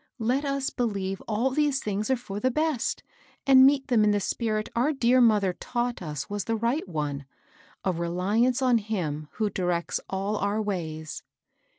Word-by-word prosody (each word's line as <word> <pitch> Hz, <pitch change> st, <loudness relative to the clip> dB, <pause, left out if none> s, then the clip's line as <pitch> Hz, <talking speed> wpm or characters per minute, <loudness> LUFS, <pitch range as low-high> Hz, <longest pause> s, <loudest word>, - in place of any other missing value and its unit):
Let 255 Hz, +5 st, 0 dB
us 275 Hz, -1 st, -1 dB
believe 195 Hz, -5 st, -2 dB
all 230 Hz, +5 st, +1 dB
these 290 Hz, 0 st, +1 dB
things 210 Hz, 0 st, -2 dB
are 265 Hz, -, +4 dB
for 205 Hz, -4 st, -6 dB
the 255 Hz, -, +2 dB
best, 305 Hz, -1 st, -1 dB, 0.4 s
and 265 Hz, -1 st, +8 dB
meet 275 Hz, -1 st, +2 dB
them 230 Hz, -4 st, +4 dB
in 210 Hz, -, +4 dB
the 205 Hz, 0 st, +2 dB
spirit 215 Hz, +1 st, -1 dB
our 260 Hz, +6 st, +2 dB
dear 255 Hz, -1 st, +3 dB
mother 210 Hz, -5 st, +4 dB
taught 240 Hz, +3 st, -3 dB
us 150 Hz, -4 st, -5 dB
was 205 Hz, -1 st, -3 dB
the 230 Hz, -, 0 dB
right 235 Hz, -, -1 dB
one, 145 Hz, -4 st, -3 dB, 0.3 s
— 185 Hz, -, -28 dB
a 190 Hz, -, +3 dB
reliance 190 Hz, +9 st, +1 dB
on 245 Hz, -2 st, +4 dB
Him 165 Hz, -9 st, -3 dB
who 215 Hz, -2 st, -1 dB
directs 175 Hz, -2 st, -1 dB
all 195 Hz, +2 st, -1 dB
our 205 Hz, +2 st, 0 dB
ways." 160 Hz, -7 st, -4 dB
215 Hz, 180 wpm, -27 LUFS, 190-250 Hz, 0.4 s, and